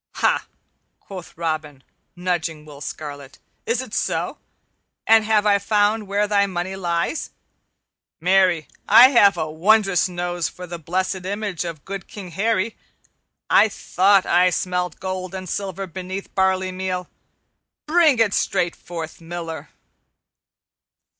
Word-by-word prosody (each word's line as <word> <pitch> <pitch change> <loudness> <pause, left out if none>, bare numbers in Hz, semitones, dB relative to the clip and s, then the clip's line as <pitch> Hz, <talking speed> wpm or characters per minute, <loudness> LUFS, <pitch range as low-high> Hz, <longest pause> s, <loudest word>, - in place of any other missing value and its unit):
"Ha!" - - +1 0.5
quoth 185 -5 -10
Robin, 155 -4 -3 0.3
nudging 170 -4 -2
Will 145 -2 -12
Scarlet. 145 -3 -7 0.3
"Is 465 - 0
it - - -12
so? - - -1 0.7
And 225 0 +6
have 215 -1 +2
I 200 -1 +4
found 210 +1 +1
where 205 +1 +1
thy 200 -1 +3
money 185 0 -3
lies? 175 - -2 0.9
Marry, 180 -2 +3 0.2
I 240 +5 +9
have 205 -7 +5
a 155 - -1
wondrous 195 +2 +3
nose 175 -1 -2
for 180 - -9
the 175 -1 -7
blessed 185 +3 -2
image 200 -3 -3
of 165 -4 -7
good 195 -1 -6
King 190 -4 -9
Harry. 210 +3 0 0.7
I 220 - +5
thought 195 0 +3
that - - -2
I 180 +1 +5
smelled 180 0 -2
gold 185 0 -4
and 185 -1 -6
silver 195 +1 -3
beneath 185 +2 -6
the - - -24
barley 190 0 +1
meal. 185 -1 -3 0.8
Bring 315 -4 +4
it 225 -3 +3
straight 175 -1 0
forth, 165 -1 -8
Miller." 165 -2 -6
185 Hz, 135 wpm, -22 LUFS, 170-200 Hz, 0.9 s, I